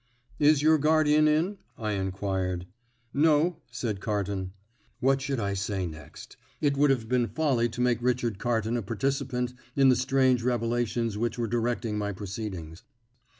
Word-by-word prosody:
"Is 150 -1 +4
your 155 0 +5
guardian 155 0 +4
in?" 170 +6 +1 0.2
I 110 -3 -2
inquired. 95 -2 -2 0.5
"No," 155 +3 +3
said 115 -5 -3
Carton. 100 -3 -2 0.5
What 135 +1 +2
should 135 -1 -2
I 100 -2 -1
say 100 -1 -2
next? 75 -3 -10 0.2
It 145 -2 +1
would 145 +1 +4
have 125 -5 +1
been 125 0 +1
folly 130 -7 +1
to 125 - -5
make 125 -2 +2
Richard 120 -4 0
Carton 115 0 0
a - - -1
participant 125 +3 -2 0.2
in 135 -1 +5
the 130 - +5
strange 130 -1 +2
revelations 115 -2 -1
which 120 +2 -1
were 120 - 0
directing 115 -1 -1
my 105 0 -2
proceedings. 95 -4 -6
120 Hz, 150 wpm, -28 LUFS, 105-135 Hz, 0.5 s, your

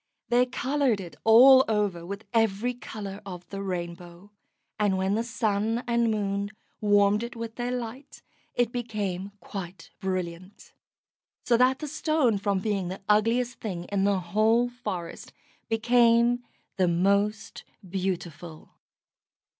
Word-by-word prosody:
They 245 +1 +4
coloured 260 -3 0
it 175 -3 -8
all 260 +4 +8
over 205 -6 0
with 200 +3 -6
every 225 +1 +1
colour 210 -4 -8
of 180 -3 -9
the 195 0 -5
rainbow, 175 0 -6 0.5
and 205 -2 +2
when 190 +1 0
the 225 +2 0
Sun 225 0 -1
or 235 - 0
Moon 205 -4 0 0.3
warmed 205 0 +3
it 235 +1 -6
with 230 -1 -6
their 240 +1 -3
light 250 +2 -6 0.3
it 245 -1 +1
became 205 -6 -3
quite 190 -2 -8
brilliant. 185 0 -5 0.7
So 240 - +4
that 255 +2 +4
the 300 - -6
Stone, 300 -7 +1
from 200 -1 0
being 195 -2 -1
the 190 +2 -7
ugliest 230 +4 +2
thing 185 -6 -4
in 200 -1 +1
the 200 -1 +2
whole 220 +7 +2
forest, 185 -9 -6 0.4
became 235 +1 +3 0.3
the 185 -2 +3
most 200 +5 0 0.2
beautiful. 175 -4 -5
210 Hz, 130 wpm, -27 LUFS, 190-235 Hz, 0.7 s, all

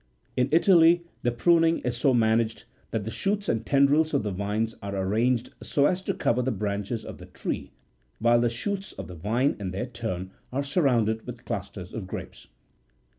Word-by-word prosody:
In 125 +1 +2
Italy 170 0 +6 0.2
the 120 - +1
pruning 165 +6 +4
is 125 -1 -1
so 130 +3 +3
managed 115 -1 +2 0.3
that 110 -2 -2
the 110 - -4
shoots 200 - -1
and 115 -1 0
tendrils 140 +5 +3
of - - +1
the 105 - -2
vines 105 +4 -1
are 100 -1 -4
arranged 115 +6 +1
so 140 - +2
as 180 +4 +2
to - - -2
cover 120 +2 +1
the 130 - 0
branches 105 +2 -3
of - - -8
the - - -11
tree, - - -4 0.5
while 120 +1 +4
the 120 - +3
shoots 195 - -3
of - - -7
the 90 - -9
vine 110 - 0
in 100 -2 -3
their 95 +6 -3
turn 95 -7 -5 0.2
are 135 +3 -1
surrounded 125 - +1
with 120 -1 -8
clusters 100 -2 -5
of 105 -5 -5
grapes. - - -8
120 Hz, 185 wpm, -26 LUFS, 105-140 Hz, 0.5 s, Italy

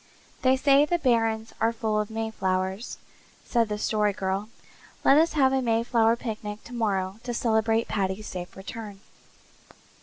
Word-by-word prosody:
"They 260 0 +4
say 275 +1 +5
the 345 +4 +1
barrens 225 -6 +1
are 225 - +3
full 220 -2 -1
of 210 - -2
mayflowers," 195 -2 -2 0.5
said 230 -3 +1
the 210 - -2
Story 210 -1 +1
Girl. 195 +2 -2 0.6
"Let 275 - +7
us 330 +1 +2
have 270 -3 +3
a 265 - +2
mayflower 230 -1 +2
picnic 215 -3 -6
tomorrow 205 -5 -2
to 240 -1 -4
celebrate 225 -1 +1
Paddy's 195 +1 -2
safe 180 -2 -7
return." 205 0 -8
220 Hz, 145 wpm, -26 LUFS, 210-235 Hz, 0.6 s, Let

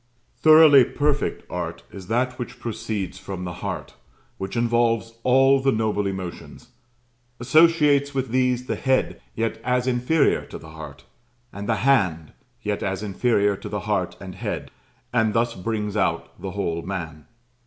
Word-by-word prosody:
Thoroughly 155 -3 +8
perfect 145 +3 -1
art 85 -2 -5
is 95 -2 -10
that 125 +3 -1
which 125 0 -6
proceeds 110 -4 -4
from 95 -2 -6
the 90 -1 -5
heart, - - -5 0.5
which 95 +4 -4
involves 115 -1 +1
all 135 +2 +4
the 135 0 +2
noble 110 -3 0
emotions; 95 -2 -7 0.7
associates 145 +1 +4
with 135 -2 -2
these 125 0 +1
the - - -2
head, 130 -1 0
yet 115 0 -2
as 125 0 +1
inferior 130 +5 +2
to - - -8
the 80 - -13
heart; 80 -4 -10 0.5
and 100 +2 -6
the 110 - +3
hand, 90 - +2 0.3
yet 105 -1 -2
as 95 +1 -2
inferior 105 0 +1
to - - -8
the 105 -2 -3
heart 100 -4 -2
and 95 -1 -8
head; - - -5 0.4
and 110 -3 +2
thus 115 0 +1
brings 105 +1 -3
out 85 -5 -1
the - - -4
whole 85 0 -2
man. 85 -5 -6
115 Hz, 155 wpm, -23 LUFS, 95-130 Hz, 0.7 s, Thoroughly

